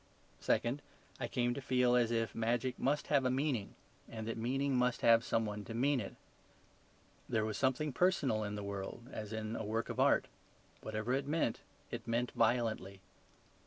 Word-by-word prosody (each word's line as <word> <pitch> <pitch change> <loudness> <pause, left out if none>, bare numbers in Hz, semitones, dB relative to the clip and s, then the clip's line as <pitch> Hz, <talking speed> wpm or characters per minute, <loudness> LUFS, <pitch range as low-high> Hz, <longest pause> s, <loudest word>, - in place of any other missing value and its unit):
Second, 125 +5 +1 0.4
I - - -2
came 120 0 0
to 140 - -5
feel 125 -2 +3
as 120 -2 +4
if 115 -1 0
magic 120 +3 0
must 145 +2 +1
have 140 -3 +4
a 130 - +2
meaning, 130 -5 -1 0.3
and 110 0 -4
meaning 135 +4 0
must 125 0 +2
have 115 0 +6
some 115 -1 +1
one 105 0 -4
to 115 - -6
mean 135 +3 +2
it. 100 - -6 1.1
There 110 -1 +1
was 110 -1 -2
something 130 +4 +1
personal 140 -11 +2
in 105 0 -3
the 105 - -4
world, 100 +4 -5
as 105 -1 -6
in 110 0 -3
a - - -3
work 110 +2 -2
of - - -4
art; - - +4 0.5
whatever 110 +3 -2
it 135 +1 0
meant 150 -6 0 0.3
it - - -5
meant 120 +2 0
violently. 110 -5 0
120 Hz, 175 wpm, -35 LUFS, 110-130 Hz, 1.1 s, have